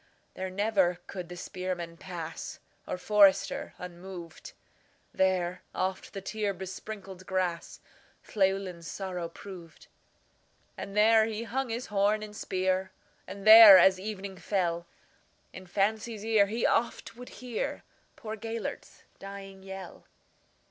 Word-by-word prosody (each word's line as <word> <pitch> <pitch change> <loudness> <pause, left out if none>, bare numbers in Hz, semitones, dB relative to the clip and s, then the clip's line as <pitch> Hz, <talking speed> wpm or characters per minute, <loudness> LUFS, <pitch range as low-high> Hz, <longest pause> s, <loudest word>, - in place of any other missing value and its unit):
There 190 0 -4
never 190 -2 +1
could 180 -3 -7
the 175 - -8
spearman 175 -2 -5
pass, 170 -2 -7 0.3
Or - - -3
forester, 200 0 +3
unmoved; 175 -1 -9 0.6
There 185 -1 +1
oft 190 +1 -2
the 195 - -5
tear 205 0 -2
besprinkled 190 0 -8
grassLlewelyn's 185 0 -3
sorrow 180 -3 -4
proved. 175 -2 -11 0.9
And 200 +1 -7
there 220 +1 +6
he 220 0 -4
hung 255 +2 -2
his 235 +2 -3
horn 205 +2 +2
and 210 -1 -9
spear, 185 -1 -1 0.4
And 195 +1 -8
there, 215 -2 +12
as 190 0 +5
evening 195 -1 -6
fell, 175 -3 -1 0.7
In 185 0 -10
fancy's 215 +3 -1
ear 220 -3 +4
he 225 +3 -1
oft 235 - 0
would 250 +1 -10
hearPoor 245 -3 -3 0.6
Gêlert's 225 +1 -6 0.2
dying 195 -1 -9
yell. 190 -1 -9
190 Hz, 115 wpm, -29 LUFS, 185-210 Hz, 0.9 s, there